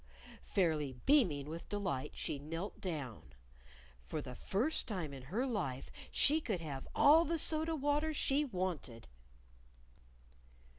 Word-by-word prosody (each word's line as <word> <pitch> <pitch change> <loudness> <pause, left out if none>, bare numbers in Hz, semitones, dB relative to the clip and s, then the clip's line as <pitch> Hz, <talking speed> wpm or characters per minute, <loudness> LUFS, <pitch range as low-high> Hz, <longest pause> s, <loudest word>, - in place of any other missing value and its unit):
"Oo!" - - -16
Fairly 155 -7 +1
beaming 175 - +4
with 165 +2 -7
delight, 190 -11 -2
she 140 - -2
knelt 165 +7 -5
down. 135 - -5 0.7
For 155 - -3
the 130 -4 -6
first 235 - 0
time 175 -9 -3
in 135 - -7
her 195 - -1
life 185 - -3 0.2
she 305 +3 +3
could 210 - -1
have 145 -5 -6
all 310 +3 +7
the 335 +1 0
soda 315 +1 +2
water 295 +2 +1
she 290 -1 +2
wanted! 180 - -3
185 Hz, 135 wpm, -36 LUFS, -, 0.7 s, all